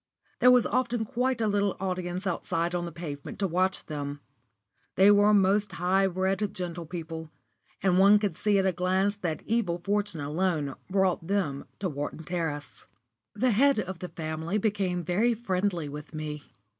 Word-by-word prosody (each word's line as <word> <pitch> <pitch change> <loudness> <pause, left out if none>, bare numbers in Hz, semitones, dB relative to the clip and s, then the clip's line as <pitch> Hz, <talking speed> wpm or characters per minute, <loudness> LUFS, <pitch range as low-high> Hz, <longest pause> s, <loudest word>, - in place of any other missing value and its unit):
There 250 - +7
was 250 -2 +6
often 240 -1 0
quite 250 +2 -1
a 220 - +2
little 205 -1 +1
audience 185 0 -3
outside 170 -1 -1
on 175 -1 -1
the 170 - -6
pavement 150 -4 -7
to 200 - 0
watch 185 +2 0
them. 145 -2 -5 0.8
They 195 +2 +7
were 205 +1 +5
most 200 0 +3
high 185 +3 +2
bred 190 +1 0
gentlepeople, 170 -4 -5 0.5
and 185 -1 +4
one 200 +2 +7
could 205 -5 -1
see 205 +3 +2
at 190 - +2
a 190 - +3
glance 185 +3 +1
that 170 -6 -3
evil 215 -7 0
fortune 205 -5 -1
alone 150 -1 -1 0.2
brought 190 -3 +1
them 180 -9 -1
to 195 - -2
Wharton 145 +1 -5
Terrace. 160 -3 -4 0.5
The 250 +4 +2
head 275 +5 +4
of 190 -3 -4
the 180 - -6
family 160 +4 -3
became 195 -4 0
very 215 +8 +2
friendly 190 -6 -1
with 150 +2 -8
me. 150 -1 -5
185 Hz, 165 wpm, -28 LUFS, 165-205 Hz, 0.8 s, There